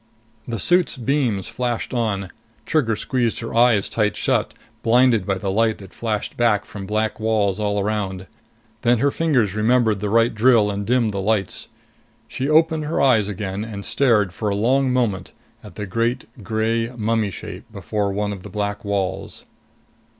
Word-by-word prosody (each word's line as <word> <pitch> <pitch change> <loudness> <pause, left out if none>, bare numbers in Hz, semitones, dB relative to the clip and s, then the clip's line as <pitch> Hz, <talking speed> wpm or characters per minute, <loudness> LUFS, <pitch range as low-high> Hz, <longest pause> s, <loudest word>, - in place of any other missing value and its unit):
The 115 -2 -3
suit's 175 - +2
beams 125 -6 0
flashed 120 +1 -3
on. 100 -5 -1 0.3
Trigger 120 -9 +1
squeezed 120 0 -1
her 115 - -6
eyes 115 -3 +4
tight 105 -2 0
shut, - - 0 0.3
blinded 120 -4 +3
by 100 - +1
the 95 0 -2
light 110 +2 +2
that 95 -2 -13
flashed 110 -3 -3
back 110 -4 +2
from 100 -2 -8
black 110 +1 -1
walls 110 -3 +1
all 105 -1 0
around. 100 -2 -2 0.6
Then 120 +1 +3
her 140 +5 +2
fingers 130 - +1
remembered 110 -1 +2
the 105 +1 -2
right 115 +2 +3
drill 110 -2 +4
and 100 0 -4
dimmed 120 -2 +2
the 100 -1 -3
lights. 100 -1 -1 0.6
She 135 +2 -3
opened 160 0 +3
her 155 - -1
eyes 115 -7 +4
again 100 0 -4
and 105 -3 -7
stared 110 -9 +2
for 105 +2 -2
a 100 - 0
long 130 +5 +2
moment 115 -8 -1 0.3
at - - -12
the 105 - -4
great 115 +5 -1 0.2
gray 110 +3 0
mummy 110 -1 0
shape 95 - -9
before 105 -2 -2
one 105 +1 -2
of 95 - -9
the 105 - -9
black 105 +1 -3
walls. 100 -2 -3
110 Hz, 170 wpm, -21 LUFS, 100-120 Hz, 0.6 s, eyes